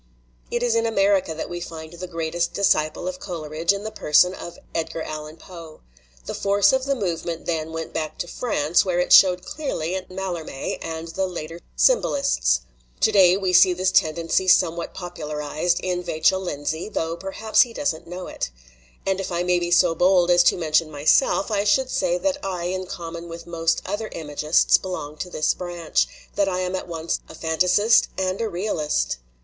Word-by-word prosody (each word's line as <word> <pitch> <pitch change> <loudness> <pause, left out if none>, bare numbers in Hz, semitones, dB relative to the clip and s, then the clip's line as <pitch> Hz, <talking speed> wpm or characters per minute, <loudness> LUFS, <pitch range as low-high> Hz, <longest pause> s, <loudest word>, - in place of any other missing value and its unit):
It 240 - -1
is 240 -2 +2
in 230 0 +1
America 195 -6 +2
that 160 - -4
we 175 0 -6
find 160 -1 -8
the 180 +2 -7
greatest 170 0 -2
disciple 155 -4 +1
of 185 0 -4
Coleridge 165 -2 -2
in 200 0 -3
the 220 - -5
person 180 -2 +3
of 175 -2 -9 0.2
Edgar 165 0 -3
Allan 155 +1 -7
Poe. 165 -4 -12 0.4
The - - -5
force 200 +1 +3
of 265 0 +1
the 275 0 +1
movement 170 -6 -3
then 160 -2 -2
went 165 0 -6
back 155 -1 -3
to 175 - -4
France, 170 -6 +1
where 180 -2 -1
it 180 - +2
showed 180 -1 +6
clearly 185 - -3
in 185 -1 -4
Mallarme 180 -7 -4
and 165 0 -5
the 190 +3 -1
later 165 -2 -7 0.2
symbolists. 275 - +2 0.4
To - - +4
day 190 -3 +6
we 190 -2 -1
see 180 +1 +7
this 185 +1 0
tendency 165 +3 +1
some 180 -2 +4
what 170 - -6
popularized 155 -1 -2
in 180 -1 -1
Vachell 180 +2 +1
Lindsay, 160 -1 -3
although 165 -5 -2
per 195 +2 -7
haps 220 0 +3
he 245 - +2
does 190 -5 -1
not 160 - -13
know 180 +2 -6
it. - - -4 0.6
And 195 0 0
if 190 -1 -4
I 175 0 0
may 180 0 +2
be 175 0 -2
so 175 0 +4
bold 180 +1 +3
as 175 0 +6
to - - +4
mention 160 -1 +1
myself, 155 - +2
I 200 -1 +1
should 255 +6 +2
say 175 - +1
that 290 +7 -2
I 185 -3 -3
in 185 +1 -3
com 170 -2 -7
mon 170 0 -8
with 170 0 -8
most 165 -1 -1
other 205 +3 -3
imagists 150 0 +2
belong 155 -5 -6
to 180 - -5
this 155 -3 +1
branch, 175 -3 -1 0.3
that 200 -1 +2
I 185 -1 -1
am 185 0 -2
at 185 - -5
once 165 -1 -3
a - - -10
fantasist 180 +7 +3
and 190 +2 -1
a 225 - -1
realist. 155 - -1
175 Hz, 195 wpm, -23 LUFS, 165-190 Hz, 0.6 s, see